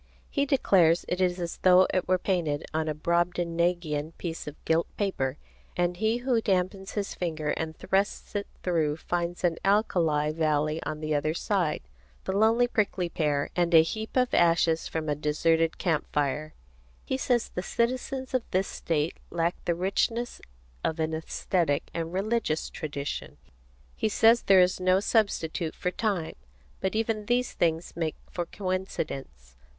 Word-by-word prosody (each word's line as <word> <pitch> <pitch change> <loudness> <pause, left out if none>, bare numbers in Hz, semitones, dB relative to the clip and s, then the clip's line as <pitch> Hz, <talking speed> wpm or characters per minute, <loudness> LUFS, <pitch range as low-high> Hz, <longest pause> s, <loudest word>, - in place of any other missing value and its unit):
He 280 0 +1
declares 180 - +4
it 180 +1 -1
is 180 0 +1
as 170 -1 -4
though 185 0 +6
it 185 - 0
were 185 - +3
painted 170 -6 -1
on 160 0 0
a 155 - -1
Brobdingnagian 170 -1 0
piece 165 -3 -5
of 150 - -6
gilt 165 +1 +2
paper, 145 -10 -1 0.4
and 175 0 +1
he 220 +3 +1
who 245 -4 +2
dampens 190 -1 -1
his 205 -2 -2
finger 155 -4 -3
and 160 -1 -3
thrusts 195 +1 -1
it 205 0 -2 0.2
through 160 -4 +1
finds 175 +1 -3
an 170 -2 +2
alkali 170 -7 +2
valley 155 0 0
on 155 0 -4
the 155 0 -1
other 155 +2 0
side, 175 -5 0 0.4
the 190 - -2
lonely 225 +4 +4
prickly 200 -6 0
pear, 145 -4 0
and 175 -1 +2
a 160 - +9
heap 220 +8 -4
of 250 -1 +2
ashes 165 -1 +3
from 160 -1 -3
a 150 - +2
deserted 160 +2 +1
camp 165 -5 -1
fire. 150 +2 -1 0.5
He - - -1
says 250 -2 +1
the 180 - -4
citizens 255 +5 -2
of 255 - +2
this 190 +1 +1
state 155 -1 -2
lack 170 0 0
the 170 - +1
richness 225 +6 -1 0.4
of 160 0 -1
an 160 0 0
æsthetic 160 -1 0
and 165 -1 -3
religious 195 -4 -1
tradition. 145 -2 -5 0.6
He 220 - 0
says 225 +3 +5
there 190 -1 +6
is 180 +1 +2
no 185 +1 +3
substitute 190 -7 0
for 180 - -2
time. 190 -6 -1 0.5
But 190 +2 -1
even 220 -1 -1
these 245 +1 +1
things 165 0 0
make 160 -2 -2 0.2
for 175 -1 -3
coincidence. 155 - -4
175 Hz, 160 wpm, -28 LUFS, 160-195 Hz, 0.6 s, a